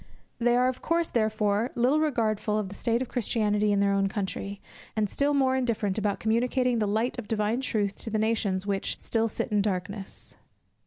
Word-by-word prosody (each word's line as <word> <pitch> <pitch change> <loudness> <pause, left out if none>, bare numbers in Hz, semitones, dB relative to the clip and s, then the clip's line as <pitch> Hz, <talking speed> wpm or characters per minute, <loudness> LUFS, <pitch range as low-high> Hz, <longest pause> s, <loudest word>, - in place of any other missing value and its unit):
They 240 0 +3
are 250 +1 +4
of 255 -1 -2
course 335 0 0
therefore, 215 0 +1
little 255 +5 +3
regardful 220 -8 0
of 210 -3 -2
the - - -8
state 235 +4 0
of - - -7
Christianity 210 -3 +1
in 200 -1 +2
their 200 0 +3
own 195 0 +2
country; 200 0 -4 0.4
and 215 -1 +1
still 285 +7 +1
more 260 -2 +3
indifferent 225 -6 0
about 205 -1 -1
communicating 245 +2 +1
the 210 - +1
light 220 +5 0
of 220 - -7
divine 220 +3 0
truth 210 -6 -1
to - - -4
the 220 - 0
nations 210 -3 0
which 200 -1 -2
"still 225 0 0
sit 225 - -3
in 210 -1 +3
darkness." 195 0 -4
220 Hz, 195 wpm, -27 LUFS, 205-245 Hz, 0.4 s, are